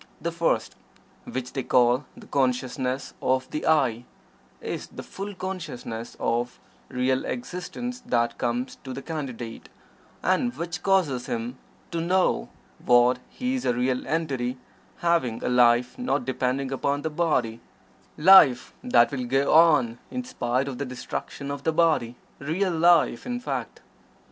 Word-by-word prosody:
The 170 - -2
first, 170 0 0 0.5
which 125 -1 -5
they 135 - -1
call 125 +2 +3
"the - - -12
Consciousness 130 0 -1
of 130 0 +1
the 150 - -3
'I'," 130 -7 +2 0.6
is - - -5
the - - -9
full 200 +1 -7
consciousness 155 -12 -6
of 120 +1 -1 0.3
real 130 +1 0
existence 245 +3 -5
that 120 -1 0
comes 120 +2 -2
to 130 - -6
the 135 - -7
Candidate, 130 -8 -6 0.5
and 185 +7 +1
which 170 0 -4
causes 160 -11 +1
him 120 +2 -4 0.3
to 170 -1 -2
know 180 - +1 0.3
that 125 +1 +5
he 255 +1 -3
is 260 - -2
a 125 - +1
real 125 +1 -1
entity 135 -6 -1 0.4
having 170 -10 +1
a - - 0
life 125 - +3
not 250 - 0
depending 130 +1 -1
upon 140 +2 -1
the 160 - -2
body 140 -9 0 0.6
life 150 -7 +7
that 120 -1 +4
will 130 -3 -3
go 135 +3 +2
on 150 -8 +5
in 255 - -4
spite 130 - -1
of 130 -3 -5
the 140 - -2
destruction 135 +2 -5
of 140 -1 -5
the 160 - +1
body 155 -8 +2 0.2
real 175 +7 0
life, 165 - +4
in 245 0 -2
fact. 245 - -4
135 Hz, 145 wpm, -25 LUFS, 125-170 Hz, 0.6 s, life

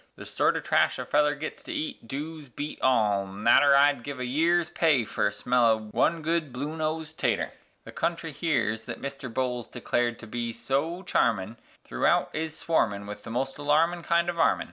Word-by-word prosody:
The - - -10
sort - - +1
o' - - 0
trash - - +2
a - - -4
feller 150 0 +2
gits 155 - -6
to 310 - -8
eat 300 - -4
doos 150 +2 -6
beat 145 +5 -6
all 105 -6 +2
nater, 115 +8 +4
I'd 140 -2 +4
give 140 +2 -6
a 125 - -2
year's 165 +6 +2
pay 150 -9 +2
fer - - 0
a - - -1
smell 125 +4 +1
o' 110 -1 +4
one 165 +6 +1
good 165 -3 0
blue 145 +5 -4
nose 160 0 -2
tater; - - 0 0.3
The - - -10
country 165 -1 -2
here 135 -8 0
thet 110 0 -8
Mister 135 -2 -6
Bolles 125 0 -2
declared 120 -1 -1
to 115 - -11
be 115 +1 -4
so 140 +10 -2
charmin' 110 - 0 0.3
Throughout - - +1
is 160 0 -3
swarmin' 100 -12 0
with 105 0 -8
the - - -9
most 135 +4 -2
alarmin' 160 +4 +2
kind 170 +1 +1
o' - - -8
varmin'. 165 -1 +2
140 Hz, 195 wpm, -27 LUFS, 120-160 Hz, 0.3 s, nater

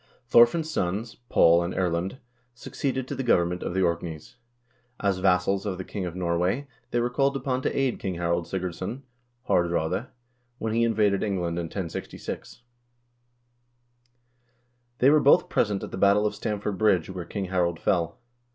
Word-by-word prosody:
Thorfinn's 120 +8 +5
sons, 105 - -2 0.2
Paul 85 +1 +5
and 85 +1 -3
Erlend, 90 +4 -1 0.4
succeeded 130 +1 -3
to - - -4
the 135 - -3
government 90 -7 +2
of 90 - -4
the 95 - +2
Orkneys. 85 +2 -3 0.6
As 100 -2 0
vassals 95 +1 +2
of 100 -3 -3
the 95 - -5
king 95 -1 -4
of 85 - -7
Norway 90 +9 0 0.2
they 120 - 0
were 120 +1 0
called 140 +2 +1
upon 130 -1 -2
to - - -2
aid 135 -3 0
King 95 -2 -3
Harald 85 0 -1
Sigurdsson 95 +7 -4 0.4
(Haardraade) 85 +5 +1 0.5
when 110 -2 -2
he 115 +1 +2
invaded 105 -4 +2
England 90 -5 -1
in 85 - -2
1066. 90 +6 -6 2.3
They 135 +3 +5
were 155 - +6
both 140 - +5
present 100 -3 0
at - - -6
the 95 - -5
battle 100 +2 +4
of 105 - 0
Stamford 105 -3 -3
Bridge, 95 -6 +3
where 90 -1 -5
King 95 +3 -4
Harald 90 -2 0
fell. 85 -2 0
95 Hz, 160 wpm, -26 LUFS, 85-115 Hz, 2.3 s, were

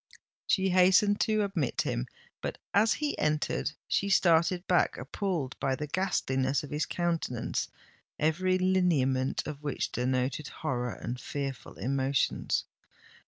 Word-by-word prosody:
She 190 -1 +2
hastened 190 +3 +5
to 215 -1 +2
admit 180 -10 -1
him;—but, - - -5 0.2
as 215 +2 +4
he 300 -1 -2
entered, 150 0 0
she 200 - +1
started 175 -1 +3
back, 180 - +2
appalled 150 0 -3
by 135 -1 0
the 150 - -4
ghastliness 140 -6 0
of 145 - -9
his 150 +1 -1
countenance, 165 -9 -1 0.5
every 185 +4 +2
lineament 165 -9 +2
of 145 -1 -6
which 145 -3 -2
denoted 130 +3 -1
horror 125 -7 -3
and 125 +2 -5
fearful 135 -5 -5
emotions. 135 +4 0
150 Hz, 120 wpm, -29 LUFS, 130-185 Hz, 0.5 s, hastened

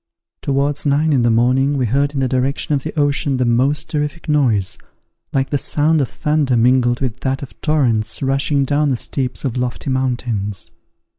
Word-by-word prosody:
Towards 140 +1 0
nine 150 +2 +2
in 130 - +3
the 120 - +3
morning 130 +5 +2
we 130 - +1
heard 140 +5 0
in 135 - 0
the 130 - +1
direction 130 +4 -1
of 140 - +1
the 155 +2 -4
ocean 145 -1 +1
the 125 - +1
most 130 +5 +1
terrific 150 +2 -3
noise, 120 -11 +1 0.5
like 135 -1 -1
the 145 - +1
sound 155 +2 +2
of 135 - -1
thunder 150 -5 0
mingled 120 +1 +3
with 130 -2 -3
that 135 +1 -2
of 135 - -12
torrents 130 -8 0
rushing 135 +1 +1
down 145 +2 +1
the 130 - 0
steeps 130 +2 -3
of 130 -2 -2
lofty 125 +2 -2
mountains. 120 -7 -2
135 Hz, 180 wpm, -18 LUFS, 125-145 Hz, 0.5 s, in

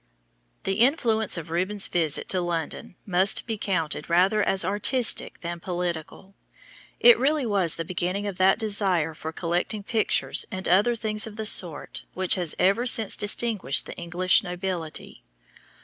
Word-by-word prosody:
The 195 +2 -2
influence 230 - +2
of 165 -1 -8
Rubens' 190 +4 0
visit 160 -4 -1
to 185 - +1
London 170 0 -5
must 190 0 +2
be 225 - -3
counted 165 -7 -3
rather 190 +5 +2
as 195 -3 +2
artistic 210 +5 0
than 170 0 -6
political. 175 +1 -5 0.7
It 480 -2 +6
really 295 0 +1
was 190 -7 0
the 165 - -5
beginning 180 +4 -3
of 200 -3 -5
that 190 +1 +4
desire 195 -7 0
for 160 +1 -7
collecting 175 +5 -2
pictures 220 +1 0
and 190 -3 -5
other 205 +7 +3
things 215 -1 -1
of 215 - -10
the 220 0 -5
sort 175 -7 +1
which 185 -1 +4
has 175 -4 0
ever 210 +7 +1
since 225 -3 +4
distinguished 205 - +1
the - - -8
English 175 +2 +2
nobility. 180 -3 -6
190 Hz, 150 wpm, -24 LUFS, 175-215 Hz, 0.7 s, It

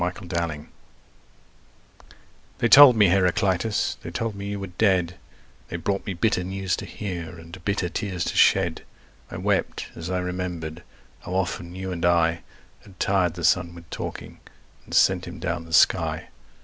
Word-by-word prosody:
Heraclitus 85 -4 -3 1.9
THEY 120 - +2
told 135 +1 +10
me, 105 -4 +5
Heraclitus, 95 +3 +1
they - - -7
told 115 -1 -3
me 100 0 -7
you 100 0 -4
were 100 - -4
dead, 90 -2 0 0.5
They - - -6
brought 100 +5 -2
me 95 - -3
bitter 90 0 +1
news 95 0 -2
to - - -7
hear 85 -4 -6
and 85 +2 -12
bitter 100 -3 -1
tears 90 0 -3
to - - -3
shed. - - +3 0.5
I - - -7
wept - - -1
as 85 +1 -6
I 90 - -1
remember'd 90 -3 -4 0.4
how 90 - -6
often 90 -2 -2
you 95 0 -5
and 85 -2 -5
I 85 -1 +3 0.4
Had 95 -2 -18
tired 90 -4 +1
the 85 - -7
sun 85 +1 +2
with 85 -1 -13
talking - - -7 0.5
and - - -6
sent 90 -1 +3
him 85 - -8
down 85 -1 -3
the 80 - -13
sky. - - +3
90 Hz, 160 wpm, -24 LUFS, 85-95 Hz, 1.9 s, told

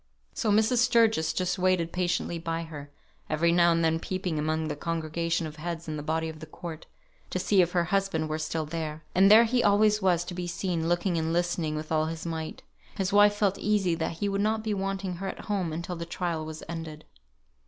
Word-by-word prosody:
So 220 - -1
Mrs. 220 +4 +3
Sturgis 230 -8 +3
just 185 +1 -1
waited 180 -2 +2
patiently 175 -1 -1
by 165 0 -3
her, 150 -3 -9 0.4
every 170 +2 +2
now 170 0 +5
and 165 0 +2
then 160 0 +2
peeping 180 -3 -3
among 155 +1 -1
the 150 - -3
congregation 165 +1 -2
of 155 0 -8
heads 170 +1 -5
in 155 - -3
the 150 - -4
body 160 +2 -1
of 160 -1 -7
the 155 - -9
court, 160 0 -8 0.4
to - - -2
see 190 +1 +3
if 175 0 0
her 175 -1 +3
husband 185 -3 0
were 155 0 -3
still 155 0 -2
there. 155 0 -5
And 190 +2 +6
there 220 +2 +9
he 240 +1 +1
always 210 +1 +4
was 180 -3 +2
to 180 - -6
be 175 0 -4
seen, 170 -1 -2
looking 175 0 +1
and 160 0 -1
listening 170 -2 0
with 155 +1 -5
all 155 0 +2
his 165 0 -5
might. 160 -1 -5 0.3
His 195 0 -1
wife 205 0 +6
felt 200 -2 +1
easy 205 -4 +1
that 165 0 -2
he 205 - -1
would 200 0 0
not 215 +1 0
be 215 -1 -1
wanting 195 -2 -3
her 195 +2 -4
at - - -5
home 195 -6 -2
until 170 +3 -4
the 170 0 -6
trial 170 -2 -2
was 155 0 -7
ended. 160 -2 -7
170 Hz, 220 wpm, -28 LUFS, 160-195 Hz, 0.4 s, there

